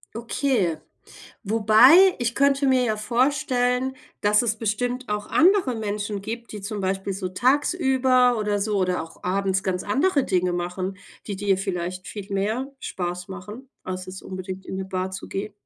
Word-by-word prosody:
Okay. 230 Hz, -, 0 dB, 0.7 s
Wobei 225 Hz, -, +6 dB
ich 240 Hz, -1 st, -1 dB
könnte 280 Hz, 0 st, +3 dB
mir 260 Hz, -1 st, +4 dB
ja 215 Hz, -2 st, 0 dB
vorstellen, 250 Hz, +2 st, +1 dB, 0.3 s
dass 210 Hz, +1 st, +4 dB
es 225 Hz, -2 st, 0 dB
bestimmt 245 Hz, +3 st, -2 dB
auch 210 Hz, 0 st, -2 dB
andere 350 Hz, -6 st, +4 dB
Menschen 205 Hz, -1 st, -3 dB
gibt, 235 Hz, +2 st, -6 dB
die 210 Hz, -, -6 dB
zum 205 Hz, 0 st, -4 dB
Beispiel 195 Hz, +1 st, -2 dB
so 185 Hz, -1 st, -4 dB
tagsüber 260 Hz, -, +3 dB
oder 210 Hz, -1 st, 0 dB
so 205 Hz, 0 st, 0 dB
oder 180 Hz, -3 st, 0 dB
auch 165 Hz, -, -13 dB
abends 190 Hz, +1 st, 0 dB
ganz 185 Hz, -1 st, -1 dB
andere 280 Hz, -, +2 dB
Dinge 180 Hz, -1 st, +1 dB
machen, 185 Hz, +2 st, -3 dB, 0.3 s
die 200 Hz, -, -3 dB
dir 195 Hz, -1 st, +1 dB
vielleicht 180 Hz, -1 st, -4 dB
viel 200 Hz, -1 st, -7 dB
mehr 220 Hz, +8 st, -1 dB
Spaß 180 Hz, 0 st, -4 dB
machen, 210 Hz, +7 st, -9 dB, 0.2 s
als 185 Hz, 0 st, -5 dB
jetzt 185 Hz, +1 st, -9 dB
unbedingt 185 Hz, 0 st, -7 dB
in 190 Hz, -, -5 dB
'ne 190 Hz, -, -3 dB
Bar 185 Hz, 0 st, -3 dB
zu 185 Hz, -, -7 dB
gehen. 200 Hz, +1 st, -4 dB
210 Hz, 165 wpm, -24 LUFS, 190-250 Hz, 0.7 s, Wobei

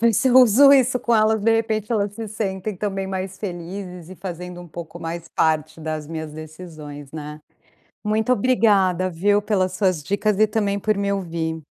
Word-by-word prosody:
ver 230 Hz, 0 st, +4 dB
se 255 Hz, +5 st, +2 dB
uso 255 Hz, +2 st, +7 dB
isso 260 Hz, -2 st, +4 dB
com 235 Hz, -1 st, +1 dB
elas, 220 Hz, 0 st, +3 dB
de 225 Hz, +2 st, +3 dB
repente 220 Hz, -1 st, -1 dB
elas 205 Hz, -2 st, 0 dB
se 225 Hz, -1 st, -5 dB
sentem, 200 Hz, -1 st, -3 dB
também, 195 Hz, 0 st, -3 dB
mais 190 Hz, 0 st, -4 dB
felizes 180 Hz, -1 st, -7 dB
e 185 Hz, -, -10 dB
fazendo 180 Hz, -1 st, -7 dB
um 175 Hz, -, -10 dB
pouco 170 Hz, +1 st, -8 dB
mais 165 Hz, 0 st, -6 dB
parte 155 Hz, 0 st, 0 dB
das 155 Hz, -1 st, -4 dB
minhas 160 Hz, -2 st, -5 dB
decisões, 155 Hz, -3 st, -10 dB
né. 150 Hz, -1 st, -7 dB, 0.6 s
Muito 220 Hz, +3 st, +1 dB
obrigada, 200 Hz, -6 st, +3 dB
viu, 205 Hz, +5 st, +2 dB
pelas 190 Hz, -3 st, 0 dB
suas 185 Hz, -4 st, 0 dB
dicas 200 Hz, +4 st, 0 dB
e 215 Hz, -, +5 dB
também 205 Hz, -2 st, 0 dB
por 215 Hz, +1 st, 0 dB
me 200 Hz, 0 st, -1 dB
ouvir. 165 Hz, -4 st, -3 dB
190 Hz, 180 wpm, -22 LUFS, 165-215 Hz, 0.6 s, uso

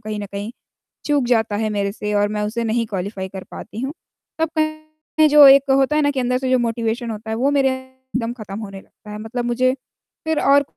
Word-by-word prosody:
कहीं 215 Hz, -1 st, -5 dB
न 205 Hz, -, -5 dB
कहीं 205 Hz, +2 st, -4 dB, 0.6 s
चूक 290 Hz, -3 st, +2 dB
जाता 220 Hz, -4 st, +1 dB
है 215 Hz, +1 st, -1 dB
मेरे 200 Hz, -1 st, -1 dB
से 210 Hz, 0 st, -4 dB
और 205 Hz, 0 st, +3 dB
मैं 210 Hz, 0 st, -2 dB
उसे 230 Hz, +3 st, -2 dB
नहीं 230 Hz, +1 st, 0 dB
क्वालीफाई 190 Hz, -1 st, -4 dB
कर 190 Hz, 0 st, -8 dB
पाती 220 Hz, -, -8 dB
हूँ। 270 Hz, +3 st, -3 dB, 0.5 s
तब 320 Hz, -1 st, +1 dB
कहीं 310 Hz, 0 st, 0 dB
जो 295 Hz, -1 st, +9 dB
एक 275 Hz, 0 st, +6 dB
होता 270 Hz, +2 st, +3 dB
है 305 Hz, -, +3 dB
ना 285 Hz, -, +2 dB
कि 275 Hz, -, -2 dB
अंदर 250 Hz, 0 st, +1 dB
से 260 Hz, 0 st, -2 dB
जो 255 Hz, -, +5 dB
मोटिवेशन 230 Hz, 0 st, -2 dB
होता 220 Hz, +1 st, -7 dB
है, 220 Hz, -, -1 dB
वो 265 Hz, +5 st, +1 dB
मेरे 275 Hz, -2 st, +3 dB
एकदम 260 Hz, -2 st, -5 dB
ख़त्म 215 Hz, -4 st, -8 dB
होने 195 Hz, -3 st, -7 dB
लगता 210 Hz, -, -15 dB
है। 210 Hz, -, -6 dB
मतलब 235 Hz, +3 st, -4 dB
मुझे 255 Hz, +2 st, +2 dB, 0.5 s
फ़िर 320 Hz, -1 st, +1 dB
और 280 Hz, +1 st, +5 dB
240 Hz, 230 wpm, -20 LUFS, 215-275 Hz, 0.6 s, जो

